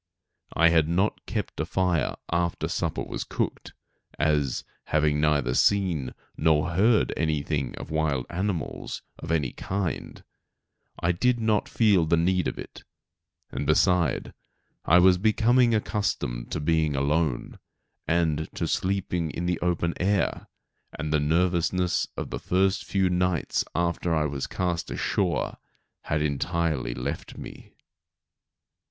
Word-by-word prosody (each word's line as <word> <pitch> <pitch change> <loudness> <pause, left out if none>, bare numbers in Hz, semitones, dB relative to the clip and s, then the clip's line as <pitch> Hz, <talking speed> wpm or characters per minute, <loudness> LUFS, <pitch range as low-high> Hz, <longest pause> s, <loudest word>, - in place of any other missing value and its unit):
I 85 +1 +6
had 80 -2 +3
not 95 +5 0
kept - - -4
a - - 0
fire 90 -6 +1 0.2
after 85 0 0
supper - - -2
was - - -4
cooked, - - -3 0.4
as, 75 -3 +1 0.2
having 75 -1 +2
neither 75 -5 +2
seen 85 -8 +2 0.2
nor 80 +1 +2
heard 105 +6 +3
anything 75 -3 -1
of - - -8
wild 75 -5 0
animals 90 -1 -3 0.2
of - - -8
any 75 -6 +1
kind, 95 -3 -4 0.8
I 85 - +2
did 120 +7 +1
not 110 -2 +1
feel 100 -8 +3
the 85 - +3
need 90 +1 +2
of - - -3
it; - - -9 0.7
and, 70 +2 -3
beside, 85 0 +2 0.5
I 85 - +6
was 90 0 +6
becoming 115 +3 +4
accustomed 100 - -2
to - - -1
being 80 -1 +1
alone, 70 0 0 0.5
and 80 -2 +1
to - - -1
sleeping 90 -3 -1
in 85 - -4
the 90 -1 0
open 85 -1 0
air, 100 +2 0 0.5
and 75 -1 -2
the 75 - +3
nervousness 90 +3 +1
of - - -4
the - - -3
first 95 +2 +1
few 95 -1 +1
nights 90 -2 +1
after 85 0 0
I 75 -1 +1
was 70 -2 -3
cast 90 -2 -2
ashore - - -1 0.5
had 75 0 0
entirely 75 -3 -1
left 65 +4 -5
me. - - -10
85 Hz, 135 wpm, -26 LUFS, 75-90 Hz, 0.8 s, I